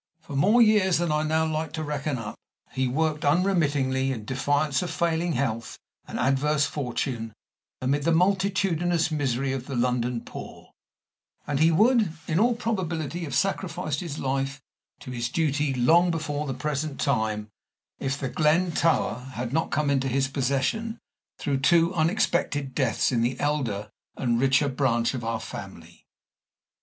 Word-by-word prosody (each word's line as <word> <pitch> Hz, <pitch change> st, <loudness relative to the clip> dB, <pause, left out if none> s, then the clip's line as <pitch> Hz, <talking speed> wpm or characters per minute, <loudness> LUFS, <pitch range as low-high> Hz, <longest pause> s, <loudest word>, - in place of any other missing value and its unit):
For 160 Hz, -3 st, -9 dB
more 210 Hz, -, +5 dB
years 205 Hz, -5 st, +4 dB
than 170 Hz, -1 st, 0 dB
I 150 Hz, 0 st, +2 dB
now 160 Hz, +1 st, +1 dB
like 155 Hz, -1 st, -2 dB
to 160 Hz, -, -3 dB
reckon 150 Hz, -2 st, -2 dB
up, 110 Hz, -3 st, -5 dB, 0.4 s
he 130 Hz, 0 st, 0 dB
worked 155 Hz, +3 st, 0 dB
unremittingly, 145 Hz, -6 st, +2 dB
in 110 Hz, -5 st, -5 dB
defiance 145 Hz, +3 st, 0 dB
of 180 Hz, -, -3 dB
failing 170 Hz, +1 st, 0 dB
health 115 Hz, -3 st, -2 dB, 0.3 s
and -, -, -5 dB
adverse 140 Hz, +4 st, +2 dB
fortune, 125 Hz, -5 st, -3 dB, 0.5 s
amid 140 Hz, +3 st, +1 dB
the 165 Hz, +4 st, +1 dB
multitudinous 180 Hz, -2 st, +1 dB
misery 135 Hz, -3 st, 0 dB
of 130 Hz, -1 st, -5 dB
the 135 Hz, -, -4 dB
London 125 Hz, -1 st, 0 dB
poor; -, -, -10 dB, 0.7 s
and 145 Hz, -1 st, -1 dB
he 160 Hz, +1 st, +5 dB
would, 220 Hz, +2 st, +4 dB, 0.2 s
in 165 Hz, +2 st, +1 dB
all 235 Hz, +2 st, +3 dB
probability, 175 Hz, -, -2 dB
have 140 Hz, -4 st, -4 dB
sacrificed 165 Hz, -3 st, -1 dB
his 160 Hz, -5 st, -5 dB
life 135 Hz, +1 st, -2 dB, 0.4 s
to 125 Hz, -, -8 dB
his 120 Hz, -1 st, -2 dB
duty 150 Hz, -2 st, 0 dB
long 160 Hz, +8 st, +4 dB
before 150 Hz, -3 st, -2 dB
the 135 Hz, -, -3 dB
present 145 Hz, +2 st, -3 dB
time 110 Hz, -5 st, 0 dB, 0.5 s
if 135 Hz, +1 st, -2 dB
The 135 Hz, -, -2 dB
Glen 160 Hz, +5 st, +2 dB
Tower 165 Hz, -8 st, +1 dB
had 120 Hz, +1 st, -4 dB
not 160 Hz, +1 st, +1 dB
come 145 Hz, -1 st, +1 dB
into 135 Hz, -1 st, +1 dB
his 135 Hz, +1 st, +1 dB
possession 140 Hz, -, -1 dB, 0.4 s
through 140 Hz, -3 st, -1 dB
two 170 Hz, +5 st, +4 dB
unexpected 160 Hz, -5 st, 0 dB
deaths 125 Hz, -3 st, +1 dB
in 120 Hz, -2 st, +1 dB
the 120 Hz, +2 st, -1 dB
elder 115 Hz, -9 st, -1 dB, 0.3 s
and 120 Hz, -2 st, +1 dB
richer 135 Hz, +2 st, +3 dB
branch 130 Hz, -3 st, +1 dB
of 125 Hz, -3 st, -4 dB
our 115 Hz, 0 st, -2 dB
family. 85 Hz, -6 st, -10 dB
145 Hz, 155 wpm, -26 LUFS, 130-165 Hz, 0.7 s, more